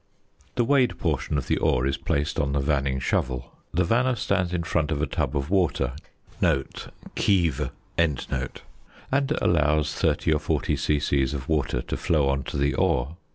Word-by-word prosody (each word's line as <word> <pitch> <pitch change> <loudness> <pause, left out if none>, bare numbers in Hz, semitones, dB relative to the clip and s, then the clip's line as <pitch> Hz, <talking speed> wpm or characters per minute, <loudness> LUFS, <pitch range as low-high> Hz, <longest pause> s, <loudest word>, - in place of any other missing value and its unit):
The 120 - +3
weighed 130 0 +3
portion 75 - -1
of 65 - -2
the - - +1
ore 65 0 +2
is 70 +1 +1
placed 75 +3 -1
on 70 -3 0
the 70 - +1
vanning 70 -2 0
shovel. 65 -1 -1 0.2
The 90 +3 +2
vanner 125 +7 +2
stands 90 -4 0
in 90 -2 -1
front 80 -2 0
of 75 - -1
a 80 - +1
tub - - -1
of 70 +4 -3
water 90 -9 +1 1.2
(kieve) 85 -8 +2 0.3
and 75 -6 +2 1.2
allows 75 -2 +2
30 80 - +1
or 75 - +1
40 - - 0
c.c. 70 -2 +1
of 65 0 -2
water 70 -6 0
to - - -4
flow 75 -4 +2
on 70 0 +1
to - - -4
the 70 +1 +1
ore. 60 +6 +1
75 Hz, 165 wpm, -25 LUFS, 70-85 Hz, 1.2 s, The